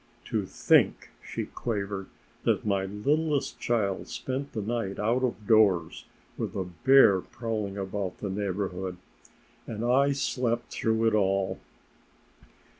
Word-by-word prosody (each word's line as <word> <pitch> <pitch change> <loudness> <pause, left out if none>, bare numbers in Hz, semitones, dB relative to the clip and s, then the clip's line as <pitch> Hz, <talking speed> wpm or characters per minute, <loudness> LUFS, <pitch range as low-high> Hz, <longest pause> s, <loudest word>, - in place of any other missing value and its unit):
"To - - 0
think," - - +3
she - - -4
quavered, 100 -4 -4 0.4
"that - - +1
my 100 -2 +1
littlest 140 +8 0
child 105 -5 0
spent 135 +2 -4
the 110 - -2
night 110 -3 -2
out 115 +5 +1
of 115 -4 -2
doors, 100 -7 +3 0.3
with - - -3
a 95 - -1
bear 95 +2 +5
prowling 110 -4 -4
about 95 -1 -3
the 100 - -4
neighborhood! 95 -2 -3 0.7
And 115 0 -4
I 140 +3 +4
slept 125 -3 -1
through 110 0 +1
it 115 - +3
all! 95 -2 +1
105 Hz, 125 wpm, -28 LUFS, 95-120 Hz, 0.7 s, bear